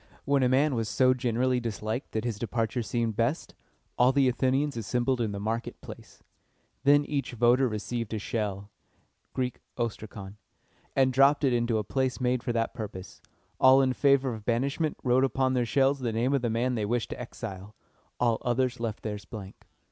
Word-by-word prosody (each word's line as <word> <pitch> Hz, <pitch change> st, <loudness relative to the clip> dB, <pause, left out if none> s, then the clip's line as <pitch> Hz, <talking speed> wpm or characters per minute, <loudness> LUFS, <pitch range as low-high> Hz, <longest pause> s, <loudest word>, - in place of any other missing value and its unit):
When 140 Hz, -1 st, +2 dB
a 125 Hz, -, +3 dB
man 140 Hz, +3 st, +3 dB
was 115 Hz, -3 st, -1 dB
so 130 Hz, +3 st, +4 dB
generally 125 Hz, 0 st, 0 dB
disliked 110 Hz, +1 st, -4 dB
that 110 Hz, -, -1 dB
his 115 Hz, -4 st, -3 dB
departure 115 Hz, +1 st, -1 dB
seemed 115 Hz, +1 st, -1 dB
best, 115 Hz, +8 st, -1 dB, 0.5 s
all 125 Hz, +1 st, +6 dB
the 135 Hz, -1 st, +3 dB
Athenians 130 Hz, +3 st, +1 dB
assembled 120 Hz, +3 st, 0 dB
in 110 Hz, -3 st, -1 dB
the 100 Hz, -, -5 dB
market 110 Hz, +3 st, -3 dB
place. -, -, -12 dB, 0.6 s
Then 145 Hz, +1 st, +5 dB
each 140 Hz, -4 st, -3 dB
voter 120 Hz, +3 st, +4 dB
received 115 Hz, +1 st, -4 dB
a -, -, -1 dB
shell 105 Hz, -2 st, -3 dB, 0.6 s
(Greek, 125 Hz, -2 st, -2 dB, 0.2 s
ostrakon), 105 Hz, -4 st, -5 dB, 0.6 s
and 130 Hz, -1 st, +3 dB
dropped 140 Hz, +3 st, +4 dB
it 135 Hz, -3 st, +3 dB
into 120 Hz, -1 st, +1 dB
a 105 Hz, -, -1 dB
place 130 Hz, +5 st, -1 dB
made 125 Hz, -1 st, +1 dB
for 120 Hz, -, -2 dB
that 115 Hz, -1 st, -1 dB
purpose. 100 Hz, -5 st, -8 dB, 0.4 s
All 130 Hz, +1 st, +7 dB
in 130 Hz, -1 st, +2 dB
favor 135 Hz, -2 st, +3 dB
of 110 Hz, -2 st, -8 dB
banishment 135 Hz, +7 st, -1 dB
wrote 130 Hz, +1 st, +3 dB
upon 130 Hz, -1 st, +1 dB
their 125 Hz, -2 st, +1 dB
shells 135 Hz, +2 st, +2 dB
the 120 Hz, -3 st, -2 dB
name 120 Hz, +5 st, 0 dB
of 140 Hz, -, +2 dB
the 120 Hz, -, 0 dB
man 120 Hz, +3 st, 0 dB
they 110 Hz, -3 st, -1 dB
wished 120 Hz, +2 st, -1 dB
to -, -, -5 dB
exile. 105 Hz, -4 st, -8 dB, 0.4 s
The -, -, +2 dB, 0.2 s
others 125 Hz, 0 st, 0 dB
left 115 Hz, -2 st, -4 dB
theirs 105 Hz, -2 st, -5 dB
blank. 100 Hz, -5 st, -10 dB
120 Hz, 185 wpm, -28 LUFS, 110-130 Hz, 0.6 s, All